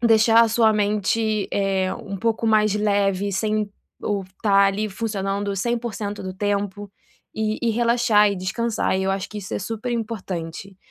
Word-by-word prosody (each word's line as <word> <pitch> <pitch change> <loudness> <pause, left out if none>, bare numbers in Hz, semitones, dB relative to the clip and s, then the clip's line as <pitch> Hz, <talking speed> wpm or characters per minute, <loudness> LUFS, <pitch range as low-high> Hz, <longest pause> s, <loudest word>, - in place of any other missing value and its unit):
deixar 225 0 +5
a 230 - +3
sua 220 -1 +4
mente, 210 +1 0
eh, 195 -2 0
um 195 -1 -7
pouco 225 +3 -1
mais 215 -2 +3
leve, 200 -1 +1
sem 210 +2 0 0.3
o 205 -2 -1
estar 195 +2 +1
ali 205 +2 -1
funcionando 200 -1 -2
100%, 220 -2 -3
do 185 - -5
tempo, 205 +1 -2 0.5
e 215 0 -1
e 235 - +1
relaxar 230 -2 +3
e 200 - -3
descansar, 200 +3 -1
e 190 - -1
eu 190 - 0
acho 195 0 -2
que 215 - -7
isso 195 -2 -8
é - - -1
superimportante. 200 -5 -4
205 Hz, 160 wpm, -23 LUFS, 195-220 Hz, 0.5 s, deixar